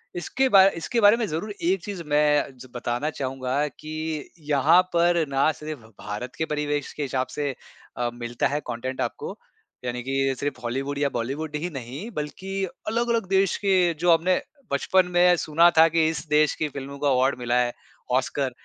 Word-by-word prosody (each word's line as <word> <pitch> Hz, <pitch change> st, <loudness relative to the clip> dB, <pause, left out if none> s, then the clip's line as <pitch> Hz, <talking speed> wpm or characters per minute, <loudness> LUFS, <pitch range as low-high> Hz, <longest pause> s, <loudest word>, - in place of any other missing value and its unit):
इसके 255 Hz, +10 st, 0 dB
बार 195 Hz, -2 st, +8 dB
इसके 230 Hz, +8 st, -1 dB
बारे 205 Hz, +3 st, +7 dB
में 235 Hz, -, 0 dB
ज़रूर 185 Hz, +6 st, -3 dB
एक 180 Hz, +1 st, +1 dB
चीज़ 195 Hz, -5 st, -5 dB
मैं 150 Hz, 0 st, +3 dB, 0.2 s
ज 130 Hz, +1 st, -11 dB
बताना 120 Hz, +5 st, -1 dB
चाहूँगा 135 Hz, 0 st, -2 dB
कि 155 Hz, +1 st, -5 dB, 0.2 s
यहाँ 155 Hz, +5 st, +5 dB
पर 170 Hz, -1 st, +3 dB
ना 135 Hz, +3 st, +3 dB
सिर्फ़ 155 Hz, -2 st, -7 dB, 0.2 s
भारत 105 Hz, +5 st, -6 dB
के 160 Hz, -, 0 dB
परिवेश 150 Hz, -1 st, -2 dB
के 150 Hz, -, -6 dB
हिसाब 130 Hz, -1 st, -1 dB
से 145 Hz, -1 st, -1 dB, 0.5 s
अ, 120 Hz, -1 st, 0 dB
मिलता 120 Hz, 0 st, -2 dB
है 145 Hz, +1 st, -1 dB
कॉन्टेंट 125 Hz, +2 st, -4 dB
आपको। 455 Hz, +1 st, -4 dB, 0.5 s
यानी 125 Hz, 0 st, -3 dB
कि 135 Hz, 0 st, 0 dB
सिर्फ़ 145 Hz, -2 st, -3 dB
हॉलीवुड 135 Hz, +4 st, -2 dB
या 140 Hz, -1 st, +1 dB
बॉलीवुड 140 Hz, +6 st, -3 dB
ही 165 Hz, +4 st, -2 dB
नहीं 135 Hz, -, -7 dB
बल्कि 150 Hz, +3 st, -5 dB, 0.3 s
अलग-अलग 230 Hz, -1 st, 0 dB
देश 195 Hz, -1 st, +2 dB
के 185 Hz, -3 st, +4 dB
जो 175 Hz, +1 st, +4 dB
हमने 180 Hz, +3 st, +2 dB, 0.3 s
बचपन 185 Hz, +6 st, +3 dB
में 180 Hz, 0 st, +6 dB
सुना 165 Hz, +3 st, +4 dB
था 160 Hz, +1 st, +8 dB
कि 165 Hz, -1 st, +2 dB
इस 160 Hz, -, -4 dB
देश 150 Hz, 0 st, +3 dB
की 155 Hz, -, -1 dB
फ़िल्मों 140 Hz, +1 st, -7 dB
को 145 Hz, -, -2 dB
अवार्ड 130 Hz, +1 st, +2 dB
मिला 120 Hz, 0 st, 0 dB
है 120 Hz, 0 st, +1 dB, 0.5 s
ऑस्कर। 130 Hz, 0 st, -1 dB
150 Hz, 180 wpm, -25 LUFS, 135-175 Hz, 0.5 s, बार